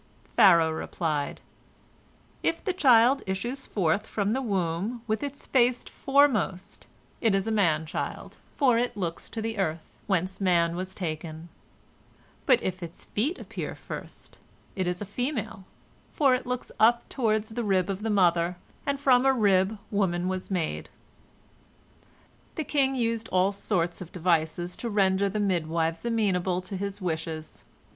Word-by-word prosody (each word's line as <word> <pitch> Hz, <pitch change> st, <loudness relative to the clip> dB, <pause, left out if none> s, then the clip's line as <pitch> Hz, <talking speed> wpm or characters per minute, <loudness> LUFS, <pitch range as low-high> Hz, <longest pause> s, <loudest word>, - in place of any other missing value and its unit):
Pharaoh 170 Hz, -4 st, +6 dB
replied: 155 Hz, -2 st, -2 dB, 1.0 s
"If 330 Hz, -, -1 dB
the 380 Hz, -, +1 dB
child 260 Hz, -5 st, +5 dB
issues 240 Hz, +8 st, -3 dB
forth 195 Hz, +2 st, 0 dB
from 205 Hz, 0 st, -1 dB
the 265 Hz, -, 0 dB
womb 200 Hz, +1 st, -2 dB
with 220 Hz, -1 st, -1 dB
its 285 Hz, -1 st, -5 dB
face 250 Hz, -1 st, +2 dB
foremost, 215 Hz, -9 st, +1 dB, 0.3 s
it 220 Hz, -4 st, +3 dB
is 195 Hz, 0 st, 0 dB
a 225 Hz, -, -1 dB
man 165 Hz, -7 st, +2 dB
child, 155 Hz, -, -5 dB, 0.2 s
for 250 Hz, -5 st, +4 dB
it 240 Hz, -3 st, -1 dB
looks 170 Hz, -4 st, -4 dB
to 225 Hz, -, -5 dB
the 225 Hz, -1 st, -3 dB
earth, 160 Hz, -3 st, -3 dB
whence 190 Hz, 0 st, -1 dB
man 170 Hz, -3 st, +3 dB
was 185 Hz, +1 st, -5 dB
taken; 160 Hz, -1 st, -5 dB, 1.0 s
but 255 Hz, -4 st, +5 dB
if 185 Hz, 0 st, -3 dB
its 170 Hz, -1 st, -8 dB
feet 285 Hz, -, -1 dB
appear -, -, -6 dB
first, -, -, -9 dB, 0.4 s
it 185 Hz, -3 st, -1 dB
is 180 Hz, +3 st, -2 dB
a -, -, -6 dB
female, 220 Hz, -3 st, -3 dB, 0.5 s
for 275 Hz, -4 st, +3 dB
it 255 Hz, 0 st, -1 dB
looks 250 Hz, 0 st, -3 dB
up 235 Hz, +2 st, +4 dB
toward 220 Hz, -4 st, +1 dB
the 220 Hz, +2 st, -5 dB
rib 190 Hz, -3 st, +2 dB
of 195 Hz, 0 st, -3 dB
the 225 Hz, -, -2 dB
mother, 175 Hz, -3 st, +3 dB, 0.3 s
and 280 Hz, -1 st, 0 dB
from 260 Hz, -3 st, +4 dB
a 270 Hz, -, +5 dB
rib 205 Hz, -4 st, +3 dB
woman 185 Hz, -4 st, 0 dB
was 185 Hz, 0 st, -3 dB
made." 180 Hz, -5 st, -2 dB, 1.7 s
The 315 Hz, -, -2 dB
king 270 Hz, -2 st, +1 dB
used 230 Hz, -2 st, -1 dB
all 185 Hz, +2 st, +3 dB
sorts 185 Hz, -4 st, -1 dB
of 180 Hz, -, -8 dB
devices 175 Hz, 0 st, 0 dB
to 235 Hz, -, -3 dB
render 195 Hz, -1 st, +2 dB
the 210 Hz, +2 st, -2 dB
midwives 165 Hz, -3 st, 0 dB
amenable 190 Hz, -6 st, +1 dB
to 185 Hz, +2 st, -7 dB
his 200 Hz, +1 st, -4 dB
wishes. 160 Hz, -2 st, -4 dB
195 Hz, 150 wpm, -27 LUFS, 175-235 Hz, 1.7 s, Pharaoh